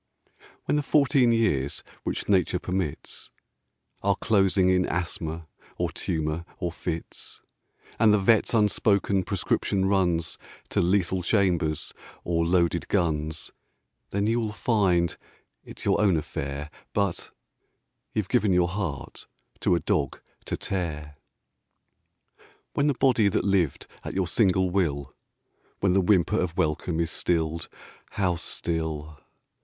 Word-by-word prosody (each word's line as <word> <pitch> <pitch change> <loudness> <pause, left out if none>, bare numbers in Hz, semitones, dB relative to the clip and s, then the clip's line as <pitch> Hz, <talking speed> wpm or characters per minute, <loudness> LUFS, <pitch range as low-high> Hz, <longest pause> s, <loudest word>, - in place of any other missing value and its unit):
When - - +1
the - - +2
fourteen 140 -4 +3
years 95 - +1 0.2
which - - -3
Nature 90 -2 +3
permits 90 -4 -4 0.7
Are - - +2
closing 95 -3 +2
in 90 0 +3
asthma, 85 -2 -3 0.3
or - - -1
tumour, 80 +1 -2
or 90 -3 -2
fits, 80 0 -6 0.6
And 110 -1 +6
the 105 - +5
vet's 110 +4 +3
unspoken 100 -2 +2
prescription 95 0 0
runs 90 -4 +1 0.3
To - - +1
lethal 90 0 +1
chambers 85 -5 +1 0.3
or 85 -1 +1
loaded 85 -1 +2
guns, 80 -4 -1 0.6
Then 100 +1 0
you 115 +2 +2
will 110 -2 -2
find 95 -8 +1 0.5
it's - - -10
your - - +3
own 95 -5 +4
affair 70 0 -4 0.2
But... 100 -4 -1 0.8
you've 105 -3 -1
given 110 -4 +2
your 90 -1 +3
heart 90 -7 -5 0.3
to 90 - +3
a - - +1
dog 70 -3 -1 0.3
to - - -3
tear. 75 -6 -4 1.6
When 145 - +2
the 145 - +2
body 125 -5 +3
that 100 - +1
lived 95 -7 +1 0.2
at - - -6
your 95 -2 +1
single 95 -3 +2
will 70 -8 -1 0.7
When 95 -2 +2
the 95 - +4
whimper 90 -2 +3
of 90 -1 -3
welcome 80 +2 0
is 85 -1 0
stilled 80 -1 -1 0.4
(how 90 -3 +1
still!) 80 -3 -3
90 Hz, 130 wpm, -26 LUFS, 80-100 Hz, 1.6 s, And